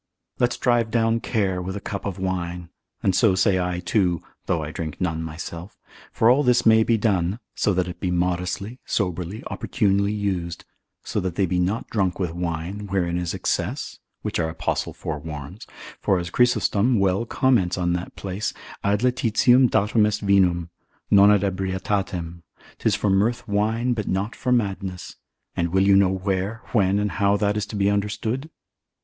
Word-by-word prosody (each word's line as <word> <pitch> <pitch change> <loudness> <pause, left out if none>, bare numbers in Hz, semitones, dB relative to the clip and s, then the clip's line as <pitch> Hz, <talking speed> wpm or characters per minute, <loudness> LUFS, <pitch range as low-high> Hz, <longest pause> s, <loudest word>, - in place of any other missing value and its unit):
Let's 120 0 +1
drive 120 -2 +2
down 115 0 +2
care 95 -6 -1
with 95 +2 -4
a - - -3
cup 100 0 -5
of 95 - -4
wine: 90 -2 -3 0.3
and 95 - +3
so 105 -5 +4
say 95 0 +3
I 90 -1 -1
too, 90 -2 +1 0.2
(though 80 -3 0
I 75 - -5
drink 80 -2 -5
none 80 -3 -1
myself) 85 +3 -7 0.3
for 110 - +2
all 130 +4 +5
this 125 -3 +3
may 110 0 +6
be 115 +1 +2
done, 100 -3 +1 0.2
so 105 - +1
that 90 0 +1
it 90 -1 -7
be 90 - -1
modestly, 90 +6 -2
soberly, 90 +3 -2
opportunely 100 -3 +1
used: 95 -5 -3 0.4
so - - -2
that 90 -2 -3
they 100 - +2
be 90 0 0
not 95 +6 -1
drunk 95 -5 0
with 90 -4 -1
wine, 90 +4 -4
wherein 90 -3 0
is 90 -1 -3
excess, - - -2 0.2
which - - -2
our 80 -1 0
Apostle 80 - -2
forewarns; 75 +3 -7 0.3
for 95 - +2
as 85 -1 -4
Chrysostom 120 -1 +2
well 95 +4 +1
comments 115 -11 +2
on 85 -1 0
that 90 +1 -4
place, 95 +1 -4 0.3
ad 100 +1 +1
laetitiam 125 +1 +4
datum 105 +1 +3
est 105 0 -2
vinum, 90 -4 +3 0.4
non 100 0 +7
ad 105 -2 +4
ebrietatem, 95 -2 -2 0.4
'tis - - +2
for 105 - 0
mirth 115 +5 +1
wine, 110 +4 +1
but 105 -3 -3
not 100 +4 -1
for 125 - -2
madness: 95 -6 -2 0.4
and 85 0 0
will 95 +3 +2
you 100 0 +5
know 95 -1 +5
where, 95 +3 -2
when, 100 -4 +3
and 105 0 0
how 100 0 +4
that 105 0 +1
is 105 -1 -2
to - - -7
be 100 -1 +2
understood? 105 +7 -1
100 Hz, 175 wpm, -23 LUFS, 90-105 Hz, 0.4 s, non